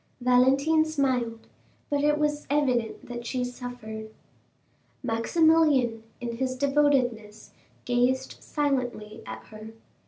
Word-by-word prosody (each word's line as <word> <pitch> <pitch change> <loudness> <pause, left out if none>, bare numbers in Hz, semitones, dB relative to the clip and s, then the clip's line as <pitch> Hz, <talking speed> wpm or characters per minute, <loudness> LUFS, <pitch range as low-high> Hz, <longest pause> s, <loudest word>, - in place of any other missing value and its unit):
Valentine 265 +5 +4
smiled, 260 -7 -1 0.5
but 285 0 +1
it 295 0 +3
was 295 0 -1
evident 255 -6 0
that 240 -1 -6
she 250 +1 -2
suffered. 245 -3 -7 0.9
Maximilian, 270 -1 +3 0.2
in 235 -1 -4
his 260 0 -1
devotedness, 255 -6 +1 0.3
gazed 245 +1 +1
silently 250 -7 -2
at 110 0 -7
her. 215 +1 -10
250 Hz, 100 wpm, -27 LUFS, 230-285 Hz, 0.9 s, Valentine